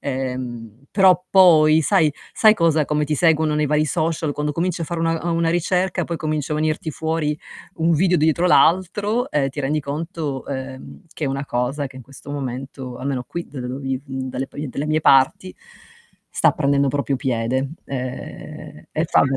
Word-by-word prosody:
ehm, 125 -3 -5
però 185 -2 +4
poi, 160 -5 +6
sai 155 0 +3 0.2
sai 215 -1 +6
cosa: 165 -6 +2
come 150 +1 0
ti 150 - 0
seguono 155 -1 +2
nei 150 0 +1
vari 150 +1 +1
social, 160 -1 -1
quando 150 +1 -2
cominci 170 +2 -1
a - - -1
fare 170 +1 -4
una 165 0 +1
uhm, - - +1
una 165 0 +1
ricerca, 180 +2 0
poi 170 -1 -4
comincia 155 -1 -2
a - - 0
venirti 155 +1 -1
fuori 160 -1 -1 0.4
un 165 +1 +2
video 180 +3 +3
dietro 160 +3 +2
l'altro, 195 +8 +2
e 140 -2 +1
ti 135 - -10
rendi 145 +3 0
conto, 150 -1 -4
ehm, 130 +6 -7
che 155 - -3
è - - 0
una 135 +1 -3
cosa 125 +4 -1
che 130 -1 -13
in 130 - -9
questo 135 +3 -12
momento, 130 -2 -6
almeno 130 -2 -3
qui 170 0 -6
da 140 - -9
dove 125 +1 -5
viv 135 -1 -3
dalle 130 -1 -4
pi 145 0 -6
delle 140 +3 -4
mie 155 +1 +1
parti, 135 +6 +3 0.8
sta - - +4
prendendo 140 -1 +1
proprio 140 0 -1
piede. 130 +1 -1
Ehm, 130 - -7
e 155 - -1
fa - - +3
be 135 -1 +1
150 Hz, 185 wpm, -21 LUFS, 135-165 Hz, 0.8 s, poi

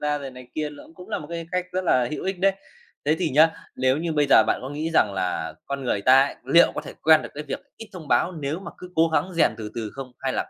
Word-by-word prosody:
ra 150 0 0
rồi 140 -2 -7
này 125 -1 -13
kia, 150 -1 -2
ló 145 - -12
cũng 180 +1 -12
là - - -2
một 150 - -9
cái 170 -1 -5
cách 180 0 -1
rất 185 0 -1
là 125 -7 +3
hữu 155 - -5
ích 190 -1 -2
đấy. 195 +1 +4 0.5
Thế 150 +2 +2
thì 180 -3 0
nhá, 155 +4 +6 0.3
nếu 130 +1 +2
như 165 +1 -2
bây 150 -1 +2
giờ - - +8
bạn - - +1
có 130 - -5
nghĩ 155 +3 -3
rằng 100 - +4
là 90 -4 -2
con 140 -1 -4
người 105 - 0
ta 130 +4 +7
ấy, - - -6
liệu 170 +6 +5
có - - -2
thể - - -9
quen 160 -1 +6
được - - -7
cái 150 - -5
việc - - -3 0.2
ít 225 - -10
thông 170 -6 -10
báo 185 - +2
nếu 155 +2 -4
mà - - -8
cứ 180 - -10
cố 165 +1 +4
gắng 180 +3 0
rèn 165 - +3
từ 105 -1 -6
từ 110 -2 -4
không 135 -2 -8
hay 130 -1 -2
là - - -2
150 Hz, 295 wpm, -24 LUFS, 130-170 Hz, 0.5 s, giờ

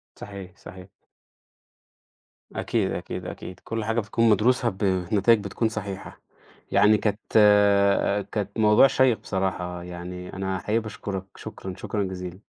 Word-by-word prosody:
صحيح، 100 -2 -10
صحيح. 95 0 -12 1.6
أكيد، - - -1
أكيد، - - -5
أكيد. 90 - -8
كل 115 -1 -3
حاجة 115 +1 0
بتكون 115 +1 +1
مدروسة 120 +3 +3
بنتائج 95 +3 +2
بتكون 110 +3 -1
صحيحة. 100 -3 -7 0.5
يعني 105 +2 +5
كانت 105 0 -1 1.1
كانت 105 0 -3
موضوع 105 +4 +6
شَيّق 130 -3 +2
بصراحة، 90 -2 -3
يعني 90 +1 -8
أنا 95 -1 -3
حقيقي 110 +4 0
باشكُرك. 100 -3 -6
شكرًا، 95 -1 -7
شكرًا 105 +1 -2
جزيلًا. 90 +1 -6
100 Hz, 120 wpm, -25 LUFS, 95-110 Hz, 1.6 s, موضوع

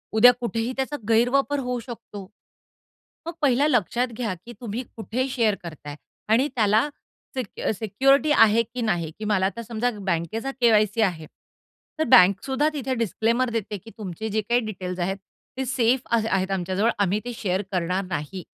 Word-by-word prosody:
उद्या 245 +3 +8
कुठेही 230 +1 -2
त्याचा 270 +2 -2
गैरवापर 270 +5 +3
होऊ 250 -1 -2
शकतो. 220 -5 -9 1.0
मग 335 - -3
पहिला 275 +1 +3
लक्षात 245 - +1
घ्या, 220 -7 -2
की 240 - -8
तुम्ही 235 +1 -4
कुठे 235 +3 -2
शेअर 230 -6 +1
करता 155 -3 -9
आहे? 145 - -6 0.4
आणि 260 +6 +4
त्याला 215 +4 +3 0.5
सिक 250 -6 -5
अ, - - 0
सिक्युरिटी 270 +8 +3
आहे, 225 -3 +5
की 240 +2 -7
नाही? 175 -8 0
की 215 - -5
मला 195 -3 +2
आता 200 +4 -4
समजा 230 +2 -1 0.2
बँकेचा 190 +9 -1
के-वाय-सी 215 -2 +3
आहे. 170 -6 0 0.7
तर 315 - +2
बँकसुद्धा 260 +12 +5
तिथे 265 -2 -2
डिस्क्लेमर 230 +5 0
देते, 210 -1 -3
की 225 +5 -14
तुमचे 205 +1 -5
जे 215 +1 0
काही 240 +1 +3
डिटेल्स 185 -3 -5
आहेत 195 +2 -2 0.4
ते 265 - 0
सेफ 245 0 +2
अ, 235 - +4
आ - - +2
आहेत 190 0 0
आमच्याजवळ, 190 +4 0
आम्ही 205 +1 +1
ते 245 - -4
शेअर 190 -2 -1
करणार 180 +2 0
नाही. 180 +1 -5
220 Hz, 170 wpm, -24 LUFS, 195-245 Hz, 1.0 s, उद्या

